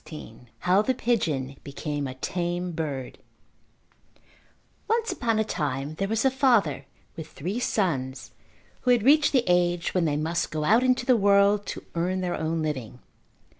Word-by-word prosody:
XVI 125 Hz, -6 st, -11 dB
How 185 Hz, +3 st, +4 dB
the 260 Hz, +4 st, 0 dB
Pigeon 150 Hz, -, -1 dB
Became 145 Hz, 0 st, -4 dB
a 130 Hz, -, -7 dB
Tame 175 Hz, +5 st, -3 dB
Bird 145 Hz, -6 st, -5 dB, 1.7 s
Once 455 Hz, +1 st, +1 dB
upon 230 Hz, -4 st, 0 dB
a 220 Hz, -, +2 dB
time 145 Hz, -6 st, -3 dB
there 195 Hz, -, 0 dB
was 225 Hz, +4 st, 0 dB
a 265 Hz, -, +4 dB
father 235 Hz, -, +2 dB, 0.3 s
with 160 Hz, -2 st, -7 dB
three 185 Hz, -, -4 dB
sons 140 Hz, -, -1 dB, 0.5 s
who 250 Hz, -, -2 dB
had 240 Hz, -4 st, +4 dB
reached 290 Hz, +4 st, +5 dB
the 260 Hz, -4 st, +3 dB
age 175 Hz, -1 st, +1 dB
when 180 Hz, -3 st, +1 dB
they 145 Hz, -2 st, 0 dB
must 165 Hz, +3 st, -1 dB
go 155 Hz, -1 st, -3 dB
out 220 Hz, +10 st, +4 dB
into 255 Hz, -1 st, +2 dB
the 255 Hz, -, +5 dB
world 200 Hz, 0 st, +3 dB
to -, -, -6 dB
earn 180 Hz, +2 st, -1 dB
their 180 Hz, -1 st, -1 dB
own 160 Hz, 0 st, -2 dB
living. 130 Hz, -7 st, -4 dB
175 Hz, 165 wpm, -26 LUFS, 150-220 Hz, 1.7 s, reached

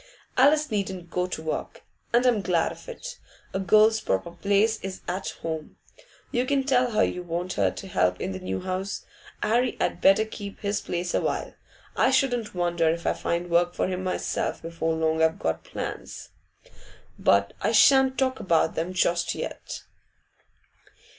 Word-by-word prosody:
Alice 295 Hz, +2 st, +4 dB
needn't 190 Hz, -4 st, -3 dB
go 180 Hz, 0 st, 0 dB
to 160 Hz, -3 st, -5 dB
work, 160 Hz, -, -4 dB, 0.3 s
and 240 Hz, +2 st, +3 dB
I'm 235 Hz, -5 st, +3 dB
glad 175 Hz, -3 st, +1 dB
of -, -, -11 dB
it; -, -, -8 dB, 0.3 s
a 190 Hz, -, -1 dB
girl's 215 Hz, +3 st, +5 dB
proper 95 Hz, -, -1 dB
place 205 Hz, +5 st, +2 dB
is 190 Hz, -1 st, -6 dB
at 185 Hz, +2 st, -2 dB
home. 160 Hz, -2 st, -5 dB, 0.5 s
You 245 Hz, +1 st, 0 dB
can 275 Hz, -1 st, +2 dB
tell 255 Hz, -2 st, +3 dB
her 215 Hz, -, +4 dB
you 180 Hz, -, -1 dB
want 175 Hz, +1 st, -3 dB
her -, -, +2 dB
to 195 Hz, -, -8 dB
help 90 Hz, -, +1 dB
in -, -, -3 dB
the 95 Hz, -, -5 dB
new 95 Hz, +1 st, -3 dB
house. 190 Hz, +2 st, -3 dB, 0.4 s
'Arry 240 Hz, +3 st, +1 dB
had 175 Hz, -, -1 dB
better 195 Hz, +3 st, +5 dB
keep 205 Hz, -2 st, -8 dB
his 205 Hz, 0 st, -1 dB
place 175 Hz, 0 st, -3 dB
awhile. -, -, -1 dB, 0.4 s
I -, -, +4 dB
shouldn't 245 Hz, -7 st, +1 dB
wonder 170 Hz, -2 st, +1 dB
if 170 Hz, +1 st, -2 dB
I -, -, +2 dB
find 170 Hz, +1 st, -2 dB
work 175 Hz, +1 st, +3 dB
for -, -, 0 dB
him 185 Hz, 0 st, -3 dB
myself 185 Hz, -, -2 dB
before 165 Hz, -1 st, -2 dB
long 160 Hz, 0 st, +1 dB
I've 160 Hz, 0 st, +3 dB
got 80 Hz, -, -2 dB
plans, -, -, -6 dB, 0.9 s
but 100 Hz, 0 st, +3 dB
I -, -, +1 dB
shan't 265 Hz, +3 st, +6 dB
talk 260 Hz, -1 st, +1 dB
about 165 Hz, -3 st, +2 dB
them 170 Hz, +3 st, -2 dB
just 175 Hz, -2 st, +1 dB
yet. -, -, -6 dB
185 Hz, 170 wpm, -26 LUFS, 170-220 Hz, 0.9 s, shan't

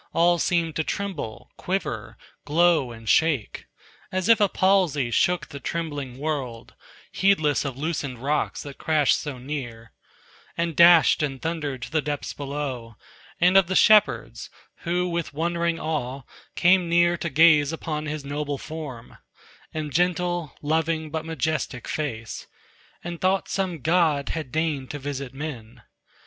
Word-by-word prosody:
All 175 Hz, +1 st, +3 dB
seemed 165 Hz, -3 st, 0 dB
to 160 Hz, -, +1 dB
tremble, 160 Hz, -, -5 dB
quiver, -, -, -3 dB, 0.3 s
glow 160 Hz, -4 st, +3 dB
and 115 Hz, -1 st, -11 dB
shake, 150 Hz, -7 st, +1 dB, 0.4 s
As 185 Hz, +3 st, -1 dB
if 230 Hz, -1 st, +6 dB
a 205 Hz, -, +4 dB
palsy 180 Hz, -11 st, +2 dB
shook 180 Hz, +8 st, +1 dB
the 140 Hz, -3 st, -8 dB
trembling 145 Hz, -6 st, -4 dB
world; 135 Hz, -6 st, -4 dB, 0.4 s
Heedless 160 Hz, -7 st, +2 dB
of 135 Hz, -2 st, -4 dB
loosened 145 Hz, -4 st, -3 dB
rocks 145 Hz, +5 st, -1 dB
that 140 Hz, -1 st, -10 dB
crashed 155 Hz, -3 st, +2 dB
so 145 Hz, -4 st, -5 dB
near, 125 Hz, -4 st, -7 dB, 0.6 s
And 170 Hz, -1 st, -1 dB
dashed 170 Hz, -1 st, +7 dB
and 135 Hz, -3 st, -2 dB
thundered 150 Hz, -6 st, -3 dB
to -, -, -7 dB
the 155 Hz, -1 st, +1 dB
depths 145 Hz, -1 st, -4 dB
below, 135 Hz, -5 st, -5 dB, 0.4 s
And 180 Hz, +2 st, +4 dB
of 195 Hz, -3 st, +6 dB
the 190 Hz, -, -2 dB
shepherds, 210 Hz, +1 st, +4 dB, 0.3 s
who 180 Hz, +1 st, -1 dB
with 170 Hz, -4 st, -3 dB
wondering 170 Hz, +1 st, 0 dB
awe 140 Hz, -4 st, -3 dB, 0.3 s
Came 180 Hz, -1 st, +4 dB
near 175 Hz, 0 st, +4 dB
to 170 Hz, -, -3 dB
gaze 155 Hz, 0 st, +5 dB
upon 155 Hz, -1 st, -4 dB
his 150 Hz, -1 st, -5 dB
noble 145 Hz, 0 st, -3 dB
form 140 Hz, -6 st, -8 dB, 0.5 s
And 155 Hz, -3 st, -5 dB
gentle, 175 Hz, -2 st, 0 dB
loving 160 Hz, 0 st, 0 dB
but 160 Hz, 0 st, -3 dB
majestic 155 Hz, -5 st, -2 dB
face, 115 Hz, -7 st, -4 dB, 0.6 s
And 170 Hz, -1 st, -6 dB
thought 190 Hz, +1 st, +1 dB
some 185 Hz, -6 st, -2 dB
god 160 Hz, -2 st, +2 dB
had 155 Hz, -6 st, -4 dB
deigned 150 Hz, -3 st, -1 dB
to 145 Hz, -, -5 dB
visit 140 Hz, -2 st, -5 dB
men. 130 Hz, -7 st, -7 dB
155 Hz, 145 wpm, -24 LUFS, 140-170 Hz, 0.6 s, dashed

